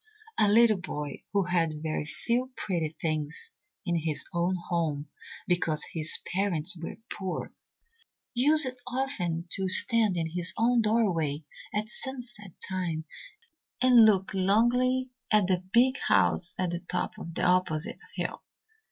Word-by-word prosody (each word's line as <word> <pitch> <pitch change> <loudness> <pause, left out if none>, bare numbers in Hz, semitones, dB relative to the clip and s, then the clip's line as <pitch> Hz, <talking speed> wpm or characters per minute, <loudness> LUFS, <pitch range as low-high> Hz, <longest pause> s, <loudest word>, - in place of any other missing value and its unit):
A 210 - +5
little 215 -1 +5
boy 145 -5 -5
who 200 -1 +2
had 165 -4 0
very 155 -1 -2
few 245 +9 -1
pretty 165 -5 -2
things 155 -1 -3 0.3
in 175 -2 0
his 160 -2 -1
own 175 +2 +1
home 155 -4 -1 0.4
because 165 -4 +1
his 155 -1 +1 0.2
parents 185 -3 0
were 165 -1 -7 0.2
poor, 190 -2 -4 0.8
used 260 0 +4
often 235 - -2
to 190 -1 -1
stand 220 -1 +4
in 160 -1 -2
his 175 +1 -1
own 235 +1 +3
doorway 180 -10 +1 0.3
at 210 +1 -2
sunset 240 -6 -4
time 175 -4 -3 0.7
and 250 -2 +7
look 195 -3 +3
longingly 245 +7 +2 0.2
at 210 -3 +4
the 185 -1 0
big 255 +3 +4
house 185 +1 +2
at 180 -2 -1
the 175 - -3
top 180 +3 -3
of 170 -4 -8
the - - -1
opposite 180 - +1
hill. - - -4
185 Hz, 135 wpm, -28 LUFS, 165-230 Hz, 0.8 s, and